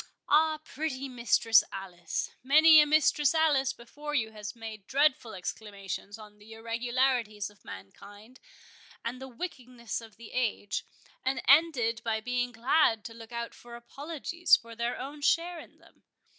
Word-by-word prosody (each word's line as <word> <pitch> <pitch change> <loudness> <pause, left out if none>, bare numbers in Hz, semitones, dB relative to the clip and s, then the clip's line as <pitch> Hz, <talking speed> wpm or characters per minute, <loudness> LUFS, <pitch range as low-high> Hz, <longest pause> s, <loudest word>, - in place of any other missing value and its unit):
—Ah, 310 +1 +4
pretty 275 -4 -4
Mistress 235 -2 +4
Alice! 180 -3 -5
many 310 +4 +7
a 300 - +2
Mistress 300 -1 +3
Alice 290 -5 +3
before 295 +5 -7
you 220 -5 0
has 210 0 -8
made 220 -3 -9
dreadful 265 -5 +1
exclamations 200 +1 -6
on 210 -1 -14
the 215 +2 -13
irregularities 230 -2 -1
of 205 - -25
mankind, 205 - -12 0.7
and 245 +2 -4
the 265 - -7
wickedness 250 - -6
of 225 -2 -14
the 230 -1 -12
age, 225 -5 -2 0.4
and 260 0 0
ended 265 -6 +4
by 225 -1 -1
being 245 +2 -2
glad 230 -1 +2
to 225 - -7
look 225 0 -12
out 235 0 -5
for 240 0 -12
apologies 310 +7 +1
for 230 0 -9
their 235 +2 -2
own 285 +3 -7
share 345 +3 +1
in - - -14
them. - - -23
240 Hz, 150 wpm, -29 LUFS, 220-285 Hz, 0.7 s, many